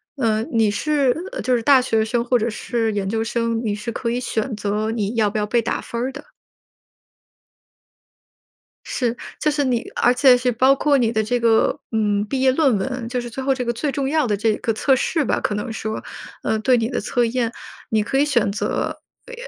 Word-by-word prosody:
呃 225 Hz, -5 st, +1 dB
你 225 Hz, -3 st, +1 dB
是 285 Hz, 0 st, +1 dB, 0.3 s
就 255 Hz, -, +1 dB
是 230 Hz, -, -3 dB
大 270 Hz, +1 st, +5 dB
学 225 Hz, -3 st, +1 dB
生 235 Hz, +1 st, 0 dB
或 245 Hz, 0 st, +2 dB
者 230 Hz, +2 st, 0 dB
是 225 Hz, 0 st, -2 dB
研 200 Hz, -2 st, -2 dB
究 225 Hz, +1 st, -1 dB
生， 230 Hz, 0 st, -1 dB
你 205 Hz, -2 st, 0 dB
是 215 Hz, +3 st, -5 dB
可 235 Hz, +1 st, -3 dB
以 240 Hz, -, -1 dB
选 230 Hz, 0 st, -2 dB
择 210 Hz, +1 st, -2 dB
你 215 Hz, -2 st, -2 dB
要 215 Hz, -2 st, +2 dB
不 210 Hz, -, -4 dB
要 210 Hz, -, 0 dB
被 235 Hz, +2 st, +1 dB
打 -, -, -2 dB
分 235 Hz, -, -5 dB
儿 255 Hz, -, -1 dB
的。 285 Hz, -, -9 dB, 2.6 s
是， 245 Hz, -2 st, -1 dB, 0.2 s
就 305 Hz, -, +2 dB
是 290 Hz, -1 st, 0 dB
你 245 Hz, -3 st, 0 dB
而 245 Hz, -, +3 dB
且 255 Hz, -1 st, +6 dB
是 250 Hz, 0 st, 0 dB
包 260 Hz, +3 st, +4 dB
括 280 Hz, 0 st, +2 dB
你 230 Hz, -2 st, +1 dB
的 220 Hz, -1 st, +1 dB
这 245 Hz, +3 st, 0 dB
个， 230 Hz, -1 st, +2 dB
嗯 210 Hz, -2 st, +1 dB
毕 260 Hz, +5 st, -2 dB
业 260 Hz, 0 st, +4 dB
论 270 Hz, -5 st, +3 dB
文 250 Hz, +2 st, -4 dB
就 250 Hz, 0 st, -2 dB
是 240 Hz, -, -7 dB
最 265 Hz, -, -5 dB
后 270 Hz, 0 st, +2 dB
这 255 Hz, -1 st, -3 dB
个 235 Hz, -, 0 dB
最 280 Hz, +4 st, -2 dB
重 270 Hz, -1 st, -1 dB
要 310 Hz, -2 st, +1 dB
的 210 Hz, -3 st, 0 dB
这 215 Hz, +1 st, +1 dB
个 225 Hz, -, -1 dB
测 265 Hz, +5 st, +2 dB
试 310 Hz, +3 st, 0 dB
吧， -, -, 0 dB
可 210 Hz, -, -1 dB
能 215 Hz, +3 st, -4 dB
说， 220 Hz, 0 st, -4 dB, 0.4 s
呃 220 Hz, -, 0 dB
对 250 Hz, +3 st, +3 dB
你 225 Hz, -1 st, 0 dB
的 250 Hz, -, -2 dB
测 240 Hz, +3 st, 0 dB
验， 235 Hz, 0 st, -1 dB, 0.4 s
你 220 Hz, -1 st, +2 dB
可 270 Hz, +6 st, -1 dB
以 285 Hz, -, +4 dB
选 240 Hz, -8 st, +1 dB
择， 205 Hz, -, -2 dB, 0.3 s
呃 -, -, -9 dB
235 Hz, 235 characters per minute, -21 LUFS, 220-260 Hz, 2.6 s, 且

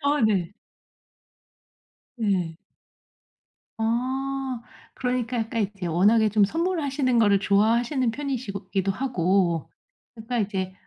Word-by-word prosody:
아 285 Hz, +1 st, +2 dB
네. 195 Hz, -4 st, 0 dB, 1.7 s
예. 185 Hz, -7 st, 0 dB, 1.2 s
아 260 Hz, +2 st, -1 dB, 0.3 s
그러니까 250 Hz, -1 st, -2 dB
약간 225 Hz, 0 st, -1 dB
이제 195 Hz, -2 st, -5 dB
워낙에 210 Hz, +6 st, +4 dB
좀 210 Hz, -1 st, +4 dB
선물하시는 285 Hz, -, 0 dB
거를 205 Hz, -3 st, +4 dB
좋아하시는 230 Hz, +6 st, +2 dB
편이시고 235 Hz, -7 st, -4 dB
기도 195 Hz, -1 st, 0 dB
하고 185 Hz, -, 0 dB, 0.4 s
그러니까 235 Hz, +1 st, -3 dB
이제 190 Hz, -3 st, -2 dB
225 Hz, 230 characters per minute, -25 LUFS, 195-255 Hz, 1.7 s, 워낙에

